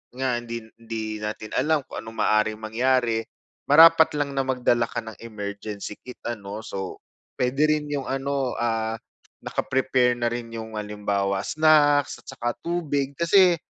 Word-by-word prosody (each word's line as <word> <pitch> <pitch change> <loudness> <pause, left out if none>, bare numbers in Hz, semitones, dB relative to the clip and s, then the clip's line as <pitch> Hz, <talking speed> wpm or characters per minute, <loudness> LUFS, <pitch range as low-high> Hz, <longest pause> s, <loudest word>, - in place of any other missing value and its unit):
nga 130 -2 0
hindi 115 -1 -6 0.2
hindi 110 -2 -5
natin 110 0 -5
alam 150 +3 +2
kung - - -7
ano'ng 115 0 -10
maaring 110 0 +2
mangyari, 115 0 +1 0.4
marapat 160 +2 +8
lang 145 -1 -1
na - - +4
magdala 125 -2 +2
ka 115 - -3
ng 110 -1 -10
emergency 105 -1 -6
kit, 125 - -10
ano. 105 -2 -5
So 95 -3 -6 0.4
pwede 130 +4 +2
rin 150 -1 0
'yong 145 -2 -2
ano, 135 -1 -1
ah, 115 -1 -1 0.5
naka-prepare 130 -2 +1
na 120 -1 0
rin 120 -1 -4
'yong, 110 -1 -6
halimbawa, 100 -2 -1
snacks 150 -2 +4
at - - -41
saka 120 -3 -3
tubig. 145 -5 -1
Kasi 175 +1 +5
120 Hz, 150 wpm, -24 LUFS, 110-140 Hz, 0.5 s, marapat